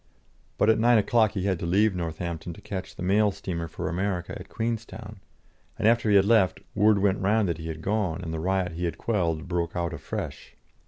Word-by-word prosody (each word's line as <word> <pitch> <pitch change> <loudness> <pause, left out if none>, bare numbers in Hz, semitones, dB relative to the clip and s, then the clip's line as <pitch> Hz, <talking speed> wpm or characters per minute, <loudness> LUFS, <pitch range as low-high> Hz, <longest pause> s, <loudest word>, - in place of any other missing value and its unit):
But 110 - +5
at 110 - +1
nine 120 +1 +5
o'clock 110 0 +3
he 95 - -2
had 95 -3 0
to 85 - -3
leave 100 +4 +3
Northampton 85 -1 -4
to - - -14
catch 95 -2 -6
the - - -6
mail 100 +3 +3
steamer 85 -3 -4
for 80 - -5
America 90 0 -2
at - - -9
Queenstown, 110 -2 -4 0.6
and - - +2
after 115 -1 +3
he 105 - +5
had 100 -1 +6
left, 105 -5 +3
word 105 +1 +4
went 100 0 +2
round 105 +1 +2
that 85 -1 -2
he 80 - -6
had 80 0 -6
gone, 100 -5 0
and 80 -2 -4
the 80 - -3
riot 95 +1 0
he 85 +2 -3
had 85 - -3
quelled 85 -8 -1
broke 85 -1 -2
out 85 -1 -2
afresh. - - -6
95 Hz, 215 wpm, -26 LUFS, 85-105 Hz, 0.6 s, had